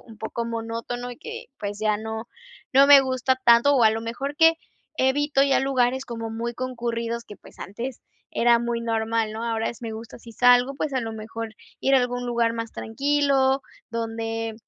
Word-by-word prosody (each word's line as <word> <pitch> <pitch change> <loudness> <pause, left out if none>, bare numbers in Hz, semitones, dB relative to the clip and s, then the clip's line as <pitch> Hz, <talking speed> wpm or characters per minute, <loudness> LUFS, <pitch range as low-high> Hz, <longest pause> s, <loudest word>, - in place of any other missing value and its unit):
un 225 -2 -15
poco 235 +1 -4
monótono 230 +2 -4
y - - -12
que, 460 +7 -8
pues, 205 0 -4
ya 215 -1 +1
no 220 +1 -6 0.5
no 275 +1 +7
me 285 -1 +10
gusta 260 -1 0
tanto, 235 +5 +6
o 250 - +4
a - - +8
lo 220 +1 -2
mejor 270 +5 -4
que 325 +1 +6 0.5
evito 275 +1 +2
ya 275 -1 +3
lugares 265 -1 +1
como 230 -2 -5
muy 230 +1 -3
concurridos 235 -2 -3
que, 205 - -11
pues, - - -17
antes 235 +6 -6 0.3
era 235 0 +4
muy 235 0 -2
normal, 225 -1 -1
¿no? 220 +1 -5
Ahora 225 -1 -1
es, 235 - -13
me 225 -1 -4
gusta 225 +2 -9
si 230 0 -13
salgo, 245 +3 +4
pues, 295 +1 -3
a 260 - +1
lo 225 -1 -4
mejor 220 0 -7 0.3
ir 270 - +3
a - - +7
algún 245 0 -2
lugar 235 -1 +1
más 230 -1 -5
tranquilo 275 +1 +1 0.3
donde 225 0 -3
235 Hz, 190 wpm, -24 LUFS, 225-265 Hz, 0.5 s, me